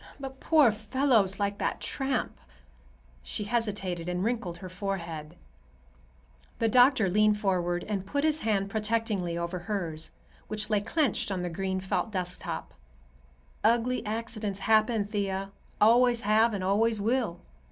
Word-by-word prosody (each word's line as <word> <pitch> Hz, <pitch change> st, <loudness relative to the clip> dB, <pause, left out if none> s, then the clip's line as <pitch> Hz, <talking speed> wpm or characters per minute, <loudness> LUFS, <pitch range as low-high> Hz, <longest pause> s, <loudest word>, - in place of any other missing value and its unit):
"But 270 Hz, -1 st, -7 dB
poor 300 Hz, -8 st, +5 dB
fellows 215 Hz, -2 st, +1 dB
like 200 Hz, 0 st, -1 dB
that -, -, -1 dB
tramp—" 270 Hz, -3 st, -2 dB, 0.8 s
she 65 Hz, -, -5 dB
hesitated 200 Hz, -6 st, -2 dB
and 180 Hz, +1 st, -1 dB
wrinkled 215 Hz, -7 st, -2 dB
her 185 Hz, -, -8 dB
forehead. 175 Hz, -5 st, -5 dB, 1.2 s
The 225 Hz, -, +1 dB
doctor 245 Hz, -2 st, +5 dB
leaned 210 Hz, +3 st, +3 dB
forward 175 Hz, -3 st, 0 dB
and 200 Hz, -3 st, -2 dB
put 285 Hz, +9 st, -2 dB
his 310 Hz, 0 st, +2 dB
hand 200 Hz, -5 st, 0 dB
protectingly 215 Hz, -5 st, -1 dB
over 170 Hz, +1 st, -3 dB
hers, 170 Hz, -5 st, -4 dB, 0.4 s
which 215 Hz, 0 st, -2 dB
lay 210 Hz, -1 st, +3 dB
clenched 280 Hz, 0 st, 0 dB
on 185 Hz, -2 st, -2 dB
the 175 Hz, -, -3 dB
green 190 Hz, +2 st, -2 dB
felt 190 Hz, +3 st, -2 dB
desktop. 180 Hz, -2 st, -4 dB, 0.9 s
"Ugly 235 Hz, +3 st, +2 dB
accidents 215 Hz, -2 st, -3 dB
happen, 220 Hz, 0 st, +3 dB
Thea; 195 Hz, -2 st, -2 dB, 0.3 s
always 240 Hz, +2 st, +5 dB
have 215 Hz, +2 st, +3 dB
and 190 Hz, -, -3 dB
always 215 Hz, +3 st, +2 dB
will. 225 Hz, -3 st, 0 dB
210 Hz, 135 wpm, -28 LUFS, 190-230 Hz, 1.2 s, poor